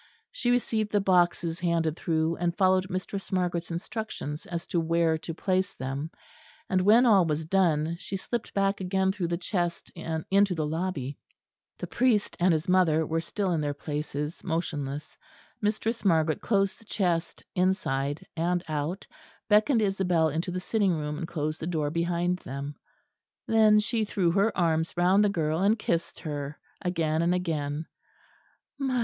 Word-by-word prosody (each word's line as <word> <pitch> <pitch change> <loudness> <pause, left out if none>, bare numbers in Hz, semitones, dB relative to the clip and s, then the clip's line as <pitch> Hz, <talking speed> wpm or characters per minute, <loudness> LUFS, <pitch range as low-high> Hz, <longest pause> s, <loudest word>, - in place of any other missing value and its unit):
She - - -1
received 225 -3 +1
the 205 - +3
boxes 175 -3 +2
handed 165 -3 +1
through, 160 -1 0
and 170 0 -1
followed 185 -1 +3
Mistress 195 +1 -4
Margaret's 175 -2 -1
instructions 170 -4 -5
as 170 -1 -4
to 175 - 0
where 165 0 +2
to 165 - -6
place 185 +1 0
them; 135 +4 -4 0.6
and 185 -1 +2
when 220 +6 +6
all 205 -6 +6
was 155 -1 -1
done, 165 -2 +2
she 195 - -4
slipped 235 +4 -4
back 195 0 +1
again 190 +1 +1
through 190 -3 -2
the 170 0 -1
chest 175 -1 -2
into 180 +4 +1
the 155 -2 -1
lobby. 155 -4 -3 0.6
The - - -4
priest 240 -4 +1
and 180 +1 +4
his 160 0 0
mother 170 -4 +3
were 165 +2 -1
still 195 +2 -2
in 165 -3 +1
their 145 -1 -2
places, 150 +1 -4
motionless. 150 -4 -3 0.5
Mistress 220 +2 -1
Margaret 160 -5 +2
closed 195 -3 +1
the 225 - -18
chest 175 -5 -1
inside 160 -4 0
and 175 +1 0
out, 155 +5 -3 0.4
beckoned 220 +3 +4
Isabel 180 -5 +2
into 165 +5 -2
the 180 +1 -2
sitting 200 0 +1
room 150 -1 -3
and 170 - -4
closed 155 -2 -3
the 160 - -4
door 155 -4 -1
behind 175 +2 0
them. 140 0 -6 0.7
Then 220 -1 +5
she 220 +1 0
threw 185 -4 +1
her 200 +5 +3
arms 165 -1 +1
round 185 +4 +4
the 205 - +3
girl 160 -4 0
and 205 +3 +4
kissed 170 -5 -2
her 145 -1 -4 0.2
again 165 -3 0
and 175 +2 +2
again. 155 -4 -2
175 Hz, 160 wpm, -28 LUFS, 160-195 Hz, 0.7 s, when